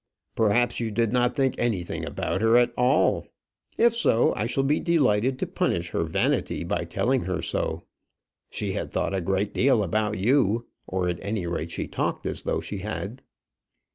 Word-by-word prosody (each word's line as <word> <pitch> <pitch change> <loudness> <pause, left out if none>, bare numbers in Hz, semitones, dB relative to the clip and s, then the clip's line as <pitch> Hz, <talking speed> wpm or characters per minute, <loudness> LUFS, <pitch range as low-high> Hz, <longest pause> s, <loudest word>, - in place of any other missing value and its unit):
"Perhaps 120 +2 +2
you 115 -2 -1
did 115 +1 0
not 125 0 +2
think 135 -2 +2
anything 105 -8 -1
about 95 - -2
her 115 +1 +5
at 120 0 +3
all. 125 +1 +2 0.5
If 235 0 +5
so, 120 - +3
I 110 - -1
shall 135 +3 0
be 145 +3 +2
delighted 130 - +2
to - - -1
punish 85 0 -1
her 85 - 0
vanity 80 - 0
by - - -2
telling 130 0 0
her 90 -1 -2
so. - - -2 0.7
She - - -3
had - - -4
thought - - -1
a 95 - 0
great 95 +3 -1
deal 125 -4 +3
about 105 +3 0
you; 115 +1 +2 0.2
or, 90 -1 -1
at 90 -1 -2
any 100 -2 -2
rate, 85 -1 -3
she - - -4
talked - - -2
as - - -3
though - - -1
she 100 - -6
had." 105 +4 -5
110 Hz, 180 wpm, -25 LUFS, 95-125 Hz, 0.7 s, her